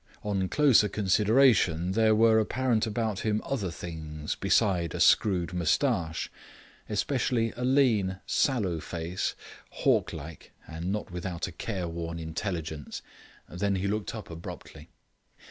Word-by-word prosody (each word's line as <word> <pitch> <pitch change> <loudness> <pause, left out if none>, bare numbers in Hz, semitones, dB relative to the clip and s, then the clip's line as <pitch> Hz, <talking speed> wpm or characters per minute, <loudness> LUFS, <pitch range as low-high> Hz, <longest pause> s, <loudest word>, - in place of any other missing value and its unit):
On 95 -3 -1
closer 135 -8 +4
consideration, 105 -4 +3
there 110 +2 +3
were 110 0 +5
apparent 115 0 +1
about 110 -2 -2
him 110 -1 0
other 110 -9 -2
things 80 -3 -6
beside 95 -4 +1
a - - -4
screwed 90 -4 +3
moustache, 85 - 0 0.6
especially 115 +1 0
a 125 - -5
lean, 115 -8 +2
sallow 100 - +1
face, 85 +3 -3 0.3
hawk - - +1
like, 80 +3 -9
and 85 +4 -4
not 105 -2 -3
without 90 -1 -4
a 95 - -6
careworn 85 -3 -4
intelligence. 80 -2 -5 0.4
Then 100 +4 -1
he 95 +1 -2
looked 105 +2 -2
up 110 -5 -8
abruptly. 80 -1 -9
95 Hz, 125 wpm, -28 LUFS, 85-110 Hz, 0.6 s, were